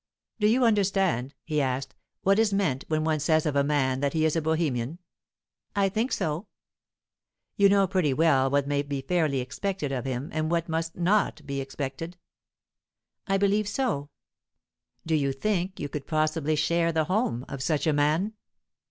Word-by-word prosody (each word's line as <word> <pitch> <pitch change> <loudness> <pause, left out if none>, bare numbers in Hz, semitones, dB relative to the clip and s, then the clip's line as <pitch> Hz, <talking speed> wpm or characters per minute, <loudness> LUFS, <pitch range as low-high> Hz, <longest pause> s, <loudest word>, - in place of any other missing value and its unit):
"Do 210 - +3
you 245 +3 +4
understand," 195 - +1
he 150 -2 0
asked, 130 0 -2 0.3
"what 195 +2 +4
is 225 -2 +3
meant 190 -10 0
when 155 -1 0
one 155 -1 +1
says 155 +1 +2
of 150 -2 0
a 140 - +4
man 135 -3 +1
that 140 0 0
he 160 -1 +2
is 160 - +1
a 165 - +1
Bohemian?" 155 -3 -1 0.8
"I 200 -1 +3
think 225 +6 -1
so." 160 +6 -2 1.1
"You 200 -2 +5
know 200 0 +4
pretty 185 -6 +1
well 135 -2 +3
what 140 0 +2
may 145 0 +1
be 140 -1 -4
fairly 155 -6 +1
expected 155 +4 -3
of 130 -2 -3
him, 130 +2 -3
and 155 0 -1
what 170 0 0
must 165 0 -2
not 175 -4 +1
be 140 -1 -3
expected?" 140 +5 -5 1.1
"I 195 0 +2
believe 200 +1 +2
so." 205 - -1 1.0
"Do 160 - -1
you 140 -3 +2
think 185 +5 -2
you 145 - -3
could 145 0 -6
possibly 155 0 +1
share 170 +2 +2
the 160 -1 +1
home 165 - -1
of 135 - -6
such 150 +3 0
a 155 - +3
man?" 155 +8 +1
155 Hz, 175 wpm, -27 LUFS, 140-190 Hz, 1.1 s, You